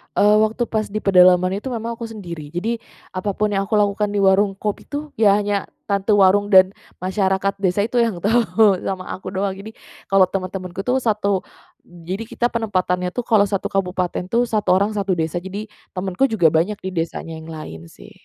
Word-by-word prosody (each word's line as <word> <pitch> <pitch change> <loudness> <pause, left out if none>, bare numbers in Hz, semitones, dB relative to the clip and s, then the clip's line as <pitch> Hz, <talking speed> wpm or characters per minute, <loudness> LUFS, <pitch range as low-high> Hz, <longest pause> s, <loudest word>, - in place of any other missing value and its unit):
Eee, 210 +1 +5
waktu 220 +3 +1
pas 215 -1 -1
di 215 +1 -5
pedalaman 185 0 +5
itu 240 - -8
memang 235 -2 -4
aku 230 - -5
sendiri. 175 -9 -8
Jadi, 225 +7 -2 0.3
apa 190 +2 -3
pun 210 0 0
yang 195 -1 0
aku 215 - 0
lakukan 210 0 +2
di 205 - +1
warung 195 +1 +4
kopi 210 +1 -4
tuh, 295 +1 -5
ya 205 -3 +5
hanya 205 -1 -1 0.2
tante 200 +1 +1
warung 205 0 +4
dan 190 -1 +7 0.3
masyarakat 190 +1 0
desa 195 +1 +1
itu 235 +3 0
yang 225 -6 +1
tahu, 220 -2 +3
sama 185 -1 -4
aku 190 - -7
doang. 195 0 -1
Jadi, 215 +3 -10 0.3
kalau 195 -1 +5
teman-temanku 185 -1 -4
tuh 250 +1 +2
satu 205 -4 0 0.4
jadi 175 +5 -6
kita 240 +1 -1
penempatannya 185 -5 -1
tuh, 245 - -2
kalau 210 -3 +3
1 195 -1 -2
kabupaten 180 -2 -2
tuh 235 +5 +2
1 215 -5 +1
orang 200 +3 +2
1 200 -2 0
desa. 160 +1 -2
Jadi, 200 +3 -6 0.3
temanku 190 +7 0
juga 215 -9 +3
banyak 170 +7 +1
di 190 - -4
desanya 165 -1 -4
yang 160 - -11
lain 155 - -8
sih. - - -15
195 Hz, 190 wpm, -21 LUFS, 185-215 Hz, 0.4 s, dan